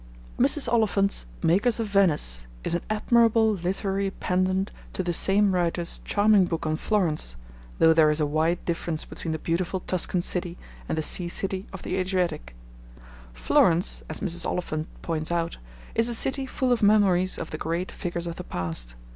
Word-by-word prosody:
Mrs. 295 - +2
Oliphant's 210 - +1 0.2
Makers 205 +8 +2
of 225 - 0
Venice 150 - +2 0.2
is - - -1
an 175 - 0
admirable 225 0 +3
literary 195 +1 -2
pendant 185 +1 -1 0.2
to 185 - -2
the 175 -1 -1
same 195 +3 +4
writer's 175 -1 0
charming 205 -2 +3
book 165 -2 -3
on 155 0 0
Florence, 160 - -1 0.4
though 160 0 +5
there 160 -1 +5
is 150 +1 +1
a 150 - +2
wide 160 +4 0
difference 165 -2 -3
between 165 - -6
the 160 - -2
beautiful 175 +3 -2
Tuscan 180 0 -1
city 175 -1 -3 0.3
and - - -1
the 160 - 0
sea 175 +3 +3
city 190 +2 -1
of 195 - -9
the 185 - -3
Adriatic. 180 - -2 0.8
Florence, 160 - +2
as - - -4
Mrs. 175 -3 -2
Oliphant 155 -3 -3 0.2
points 160 -1 -3
out, 170 -1 -1 0.4
is 230 +1 +2
a 235 - +3
city 265 +3 +1
full 255 0 -1
of 245 - +2
memories 195 -3 +3
of 160 - -6
the 155 - -5
great 170 +3 -3
figures 175 -1 -4
of 170 -1 -5
the 180 - -6
past. 80 - -4
180 Hz, 170 wpm, -25 LUFS, 165-200 Hz, 0.8 s, though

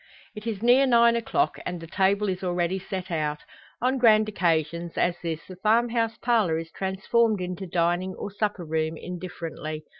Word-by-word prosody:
It 215 +1 -8
is 215 -2 -3
near 255 +3 +5
nine 235 -1 +5
o'clock, 295 +10 0
and 180 - -4
the 165 - -8
table 195 +4 +1
is 185 0 -3
already 180 +1 0
set 190 -1 -6
out. 150 -2 -1 0.4
On 260 +1 +2
grand 215 -3 +5
occasions, 170 -3 -1
as 175 0 +2
this, 165 -2 -3
the 185 - -10
farm 225 +5 +3
house 230 -1 -1
parlour 220 -9 +2
is 165 0 -6
transformed 205 +3 +1
into 180 +1 -4
dining 175 +2 0
or 205 - -6
supper 205 -3 -2
room, 160 0 -1
indifferently. 165 -4 -6
190 Hz, 175 wpm, -26 LUFS, 170-220 Hz, 0.4 s, near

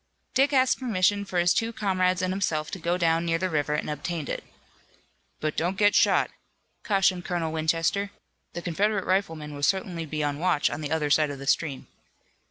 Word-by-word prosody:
Dick 270 +3 +3
asked 260 -2 +3
permission 205 -4 +1
for 185 - -4
his 175 0 +4
two 225 0 0
comrades 185 -4 0
and 185 0 0
himself 155 -6 -1
to 195 - -5
go 175 +2 0
down 165 -1 +2
near 165 -1 +1
the 185 +2 -2
river 150 -1 0
and - - -2
obtained 150 +1 -4
it. - - -3 1.0
"But 155 -1 -2
don't 180 +3 -1
get 205 -1 +4
shot," - - +3 0.5
cautioned 195 -3 +2
Colonel 170 -3 -2
Winchester. 165 +5 0 0.4
"The 175 - -6
Confederate 195 +3 0
riflemen 165 -6 -1
will 145 - -7
certainly 175 -1 0
be 155 0 -2
on 145 0 -2
watch 175 -3 +2
on 155 - -4
the 150 - -4
other 150 -2 0
side 155 0 +4
of 140 - -5
the 135 - -8
stream." 140 -1 0
175 Hz, 190 wpm, -26 LUFS, 155-195 Hz, 1.0 s, his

